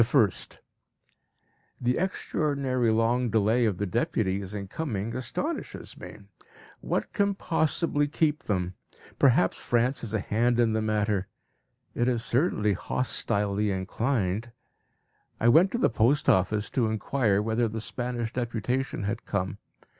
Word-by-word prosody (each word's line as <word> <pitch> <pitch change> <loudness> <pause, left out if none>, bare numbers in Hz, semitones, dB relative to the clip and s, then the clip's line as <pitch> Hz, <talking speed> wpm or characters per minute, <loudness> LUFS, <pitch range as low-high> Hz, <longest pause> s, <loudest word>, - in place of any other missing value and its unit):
The 115 - +4
1st. 100 - +1 1.2
The 125 0 +1
extraordinary 140 -9 0
long 115 +2 +2
delay 110 +2 +3
of 105 -5 0
the 105 - -1
deputies 100 -2 -1
in 100 -2 -5
coming 115 -4 -3
astonishes 280 - -4
me. - - -10 0.6
What - - -2
can 200 -1 +1
possibly 160 -4 0
keep 150 0 0
them? 90 -3 -1 0.5
Perhaps 120 -9 +4
France 120 +3 +1
has 115 - -5
a 110 - 0
hand 120 +4 +1
in 115 -2 +3
the 110 - +1
matter; 105 -2 0 0.7
it 120 - 0
is 120 -3 0
certainly 115 - +1
hostilely 105 -1 -1
inclined. 105 +2 -1 0.9
I 115 - +2
went 170 +10 +6
to - - +1
the 240 - +3
post 120 +5 +2
office 105 +3 +2
to 120 -4 +1
inquire 110 -1 +1
whether 115 +2 +1
the 110 +1 -4
Spanish 120 0 -4
deputation 120 0 -2
had 105 +3 -3
come. 95 0 -2
115 Hz, 135 wpm, -27 LUFS, 105-130 Hz, 1.2 s, went